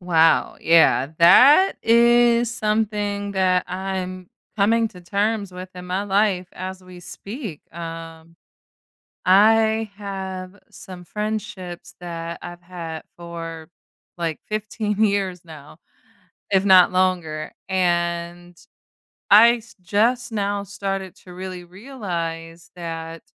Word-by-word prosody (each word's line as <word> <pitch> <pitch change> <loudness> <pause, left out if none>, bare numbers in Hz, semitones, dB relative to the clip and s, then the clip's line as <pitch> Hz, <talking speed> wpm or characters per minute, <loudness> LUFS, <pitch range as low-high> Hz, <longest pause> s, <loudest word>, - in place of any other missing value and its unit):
Wow, 165 -2 +3
yeah, 160 -4 +4
that 275 - +7
is 235 0 +4
something 210 -2 -1
that 185 -2 +2
I'm 185 -1 -4 0.3
coming 225 +3 +3
to 185 -5 -14
terms 200 +3 -1
with 185 +1 -9
in 180 0 -9
my 185 +2 -1
life 195 -2 +1
as 185 +1 -7
we 180 -1 -13
speak, 195 - -8
um 165 0 -9 0.9
I 220 +3 +4
have 190 -1 -6
some 180 -2 -11
friendships 205 -3 -5
that 170 -1 -6
I've 175 0 -9
had 170 -3 -7
for, 165 -2 -8 0.5
like, 165 -3 -3
15 215 0 -2
years 195 -4 -1
now, 155 -2 -13 0.7
if 195 0 +2
not 185 -2 +7
longer, 175 -4 0 0.2
and 175 -1 -1 0.7
I 230 +4 +8
s 225 0 -17
just 235 +5 +1
now 205 -1 -1
started 195 -2 -5
to 180 - -12
really 185 0 -7
realize 170 -6 -6
that 165 -1 -7
185 Hz, 110 wpm, -22 LUFS, 170-210 Hz, 0.9 s, I